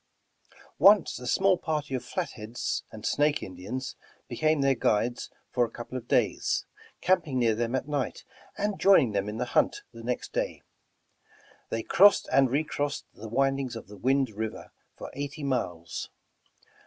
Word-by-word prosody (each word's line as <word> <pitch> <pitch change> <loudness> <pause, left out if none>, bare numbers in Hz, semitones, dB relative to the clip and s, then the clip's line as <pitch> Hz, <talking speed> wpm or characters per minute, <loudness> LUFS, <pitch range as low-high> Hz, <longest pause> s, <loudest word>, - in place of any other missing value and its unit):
Once 195 -1 +6
a 125 - -7
small 190 +6 +3
party 150 -4 -2
of 130 - -2
Flatheads 120 - -3
and 110 -1 -9
Snake 150 +1 +2
Indians 120 +8 -6 0.3
became 155 +4 +1
their 135 0 +4
guides 120 0 0 0.2
for 125 - +2
a 120 - -1
couple 120 +3 -8
of 120 -2 -5
days, - - +1 0.4
camping 170 -8 +2
near 115 -3 +3
them 120 +3 -1
at 130 +1 -2
night, 145 -4 -3 0.3
and 205 0 -1
joining 175 - +6
them 100 0 -1
in 105 - -5
the 125 - -1
hunt - - +2
the 115 - -10
next 120 +1 -3
day. - - -2 1.1
They 115 0 -2
crossed 205 +2 +5
and 135 -2 +5
recrossed 145 +1 -1
the 110 +1 -9
windings 135 0 0
of 115 - -7
the 105 - -10
Wind 135 +2 +1
River 110 +1 -5 0.3
for - - -8
eighty 145 +2 -5
miles. 90 -12 -3
130 Hz, 155 wpm, -28 LUFS, 115-150 Hz, 1.1 s, Once